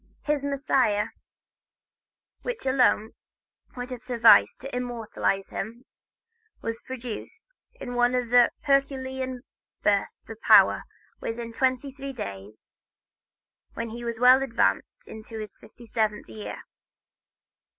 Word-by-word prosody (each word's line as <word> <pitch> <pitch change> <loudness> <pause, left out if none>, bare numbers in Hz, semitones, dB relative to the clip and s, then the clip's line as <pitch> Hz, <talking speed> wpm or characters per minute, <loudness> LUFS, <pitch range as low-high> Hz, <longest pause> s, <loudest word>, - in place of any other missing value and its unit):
His 295 -2 0
"Messiah," 265 -7 +1 1.3
which 485 - -5
alone 250 -4 +3 0.7
would 250 +1 -5
have 250 -2 -6
sufficed 230 - +5
to 270 0 -6
immortalize 230 -5 -2
him, 235 +5 -6 0.7
was 230 0 -4
produced, 255 - -7 0.3
in 245 - -7
one 245 +1 +2
of 245 -2 -1
his 245 -1 +7
herculean 265 -2 -1 0.4
bursts 200 -1 0
of 225 0 -10
power, - - +6 0.3
within 230 0 -5
twenty 260 +2 0
three 275 0 -7
days, 100 - -8 1.0
when 230 -1 -4
he 240 +1 -7
was 235 -1 -3
well 250 +2 +7
advanced 260 -4 0
in 220 0 -10
his 215 -1 -8
fifty 240 - -15
seventh 215 -2 -1
year. 215 -1 -8
245 Hz, 115 wpm, -26 LUFS, 225-260 Hz, 1.3 s, his